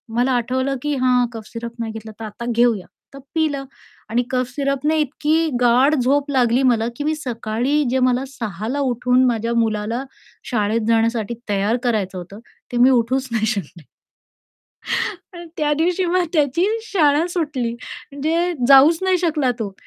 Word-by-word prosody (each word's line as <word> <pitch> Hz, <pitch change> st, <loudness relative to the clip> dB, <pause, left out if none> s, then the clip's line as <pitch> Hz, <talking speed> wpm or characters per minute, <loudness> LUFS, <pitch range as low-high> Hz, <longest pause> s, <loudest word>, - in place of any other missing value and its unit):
मला 250 Hz, +2 st, +2 dB
आठवलं, 260 Hz, +3 st, 0 dB
की 295 Hz, -1 st, -1 dB
"हां 250 Hz, -1 st, +3 dB
कफ 220 Hz, -2 st, -8 dB
सिरप 235 Hz, -1 st, -6 dB
नाही 225 Hz, -1 st, -3 dB
घेतला, 220 Hz, 0 st, -8 dB
तर 225 Hz, -, -5 dB
आता 215 Hz, +3 st, -7 dB
घेऊया." 235 Hz, -4 st, +2 dB, 0.3 s
तर 275 Hz, -, -10 dB, 0.2 s
पिलं 305 Hz, -4 st, 0 dB, 0.5 s
आणि 240 Hz, +2 st, +1 dB
कफ 255 Hz, -1 st, 0 dB
सिरपने 280 Hz, +2 st, 0 dB
इतकी 310 Hz, +3 st, +1 dB
गाढ 250 Hz, +5 st, +4 dB
झोप 275 Hz, +3 st, +1 dB
लागली 250 Hz, -1 st, +2 dB
मला 235 Hz, -3 st, +2 dB
की 290 Hz, -, -4 dB
मी 310 Hz, -, +1 dB
सकाळी 250 Hz, +1 st, -1 dB
जे 260 Hz, +1 st, +1 dB
मला 255 Hz, 0 st, +2 dB
6.00 220 Hz, -6 st, -6 dB
ला 280 Hz, +4 st, -2 dB
उठून 250 Hz, -1 st, +2 dB
माझ्या 235 Hz, -1 st, 0 dB
मुलाला 225 Hz, +2 st, 0 dB, 0.5 s
शाळेत 220 Hz, 0 st, +1 dB
जाण्यासाठी 230 Hz, -1 st, +1 dB, 0.2 s
तयार 205 Hz, +4 st, +1 dB
करायचं 205 Hz, -6 st, -1 dB
होतं, 185 Hz, +4 st, -9 dB, 0.3 s
ते 240 Hz, -, -2 dB
मी 250 Hz, +2 st, +6 dB
उठूच 255 Hz, +2 st, +1 dB
नाही 220 Hz, -1 st, 0 dB
शकले 185 Hz, -7 st, -4 dB, 1.5 s
आणि 345 Hz, 0 st, -9 dB
त्या 295 Hz, -1 st, +1 dB
दिवशी 350 Hz, +4 st, +1 dB
मग 360 Hz, +1 st, +1 dB
त्याची 300 Hz, +3 st, +2 dB, 0.2 s
शाळा 310 Hz, -6 st, +2 dB
सुटली 295 Hz, -9 st, -2 dB
म्हणजे 315 Hz, +8 st, -3 dB
जाऊच 280 Hz, +4 st, +7 dB
नाही 375 Hz, -1 st, +3 dB
शकला 310 Hz, -7 st, +1 dB
तो. 200 Hz, -3 st, -4 dB
255 Hz, 160 wpm, -20 LUFS, 230-290 Hz, 1.5 s, जाऊच